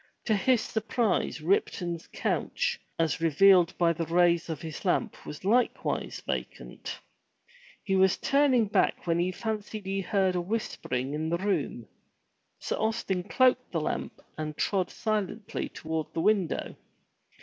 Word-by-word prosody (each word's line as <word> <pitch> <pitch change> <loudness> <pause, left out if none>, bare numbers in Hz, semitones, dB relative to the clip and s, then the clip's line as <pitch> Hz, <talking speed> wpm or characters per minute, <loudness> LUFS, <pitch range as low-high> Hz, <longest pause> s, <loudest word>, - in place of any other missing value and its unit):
To 215 - +3
his 245 +3 +3
surprise 220 -6 -1
Ripton's 175 -1 0
couch - - -1 0.2
as 165 -1 0
revealed 175 +3 +5
by 170 -1 +3
the 165 0 -3
rays 170 -1 +3
of 160 -4 -3
his 160 -2 -6
lamp 200 +4 -1
was 150 +5 -8
likewise 235 +4 0
vacant. - - -5 0.9
He 195 - 0
was 190 -1 +4
turning 275 -5 +3
back 205 - +1
when 170 -1 +1
he 180 +2 +1
fancied 215 0 -4
he 195 +1 -1
heard 190 0 +1
whispering 175 - -2
in 155 +1 -2
the 170 - +1
room. 170 - -2 0.7
Sir - - -3
Austin 220 -4 -1
cloaked 255 +7 +2
the - - -1
lamp - - -3 0.2
and 155 -1 -4
trod 190 -3 0
silently 215 0 -2
toward 160 -1 -4
the 165 - 0
window. 195 -3 +1
190 Hz, 140 wpm, -28 LUFS, 165-215 Hz, 0.9 s, revealed